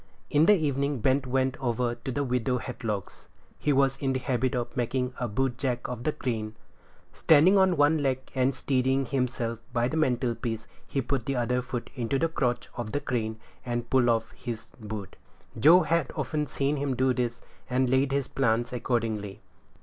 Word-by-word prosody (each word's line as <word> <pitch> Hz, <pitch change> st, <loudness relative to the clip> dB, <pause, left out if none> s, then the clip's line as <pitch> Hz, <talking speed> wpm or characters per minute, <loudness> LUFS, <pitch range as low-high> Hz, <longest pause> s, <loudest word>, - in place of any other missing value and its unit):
In 150 Hz, +2 st, +4 dB
the 210 Hz, -, +8 dB
evening 140 Hz, -2 st, 0 dB
Ben 130 Hz, +5 st, +3 dB
went 130 Hz, +1 st, +1 dB
over 120 Hz, -1 st, 0 dB
to 130 Hz, -, -6 dB
the 145 Hz, +3 st, -1 dB
widow 125 Hz, -1 st, 0 dB
Hadlock's. 115 Hz, -5 st, -5 dB, 0.3 s
He 150 Hz, -, +1 dB
was 135 Hz, -1 st, +3 dB
in 135 Hz, -2 st, +1 dB
the 130 Hz, -, 0 dB
habit 130 Hz, +1 st, 0 dB
of 120 Hz, -1 st, -3 dB
making 125 Hz, +1 st, -1 dB
a 120 Hz, -, -1 dB
bootjack 125 Hz, +2 st, -1 dB
of 125 Hz, -1 st, -6 dB
the 155 Hz, -, +2 dB
crane; 110 Hz, -6 st, -3 dB, 0.6 s
standing 160 Hz, +5 st, +5 dB
on 190 Hz, -3 st, +4 dB
one 145 Hz, +1 st, +4 dB
leg, 135 Hz, -2 st, +1 dB, 0.2 s
and 130 Hz, 0 st, +1 dB
steadying 130 Hz, 0 st, +1 dB
himself 125 Hz, -3 st, -1 dB
by 120 Hz, 0 st, +1 dB
the 155 Hz, -, -2 dB
mantel 125 Hz, -5 st, +1 dB
piece, 115 Hz, -2 st, -4 dB, 0.2 s
he 135 Hz, -, -1 dB
put 130 Hz, -2 st, -2 dB
the 135 Hz, -, 0 dB
other 125 Hz, +1 st, +1 dB
foot 125 Hz, -1 st, -5 dB
into 125 Hz, +1 st, -1 dB
the 165 Hz, +4 st, +1 dB
crotch 125 Hz, -6 st, -1 dB
of 120 Hz, -3 st, -5 dB
the 145 Hz, -, +1 dB
crane, 115 Hz, -5 st, -2 dB, 0.2 s
and 120 Hz, -1 st, -3 dB
pulled 130 Hz, -2 st, +4 dB
off 115 Hz, -1 st, +1 dB
his 115 Hz, -3 st, -6 dB
boot. 105 Hz, -3 st, -7 dB, 0.4 s
Joe 165 Hz, +9 st, +8 dB
had 165 Hz, -3 st, +1 dB
often 150 Hz, -1 st, -1 dB
seen 140 Hz, +2 st, -1 dB
him 140 Hz, -2 st, -1 dB
do 130 Hz, +1 st, +2 dB
this, 120 Hz, -2 st, -2 dB, 0.3 s
and 130 Hz, +1 st, +2 dB
laid 130 Hz, +2 st, +2 dB
his 140 Hz, -1 st, 0 dB
plans 120 Hz, -2 st, 0 dB
accordingly. 110 Hz, -5 st, -2 dB
130 Hz, 185 wpm, -28 LUFS, 120-135 Hz, 0.6 s, the